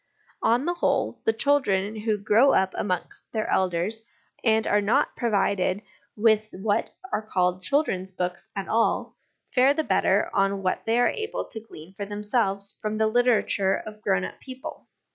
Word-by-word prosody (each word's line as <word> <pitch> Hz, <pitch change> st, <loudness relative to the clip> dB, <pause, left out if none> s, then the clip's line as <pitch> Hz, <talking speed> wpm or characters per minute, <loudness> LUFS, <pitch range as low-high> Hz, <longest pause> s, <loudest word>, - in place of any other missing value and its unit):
On 240 Hz, +5 st, +2 dB
the 350 Hz, -, +1 dB
whole, 345 Hz, -, 0 dB
the -, -, +4 dB
children 220 Hz, -5 st, +1 dB
who 215 Hz, 0 st, -1 dB
grow 215 Hz, +7 st, +4 dB
up 190 Hz, 0 st, +2 dB
amongst 180 Hz, -3 st, -3 dB
their 220 Hz, -1 st, -1 dB
elders 185 Hz, +4 st, 0 dB, 0.4 s
and 220 Hz, -1 st, +3 dB
are 205 Hz, 0 st, +3 dB
not 230 Hz, +8 st, +1 dB
provided 200 Hz, -4 st, 0 dB, 0.3 s
with 215 Hz, 0 st, +3 dB
what 205 Hz, +2 st, -1 dB, 0.2 s
are -, -, +1 dB
called 180 Hz, -4 st, 0 dB
children's 190 Hz, -6 st, 0 dB
books 180 Hz, -1 st, -4 dB
at 195 Hz, -1 st, -4 dB
all, 225 Hz, +1 st, +1 dB, 0.4 s
fare 265 Hz, +3 st, +5 dB
the 315 Hz, -, 0 dB
better -, -, +2 dB
on 195 Hz, 0 st, +1 dB
what 185 Hz, -, -1 dB
they 225 Hz, +1 st, +2 dB
are 245 Hz, -, +4 dB
able 440 Hz, 0 st, -3 dB
to 220 Hz, -, -6 dB
glean 175 Hz, -5 st, -13 dB
for 200 Hz, +1 st, -6 dB
themselves 205 Hz, -1 st, -1 dB
from 215 Hz, 0 st, -2 dB
the 220 Hz, -, +2 dB
literature 220 Hz, -4 st, +2 dB
of 215 Hz, 0 st, -8 dB
grown 195 Hz, -2 st, +1 dB
up -, -, -9 dB
people. 260 Hz, -1 st, -9 dB
210 Hz, 165 wpm, -25 LUFS, 195-230 Hz, 0.4 s, fare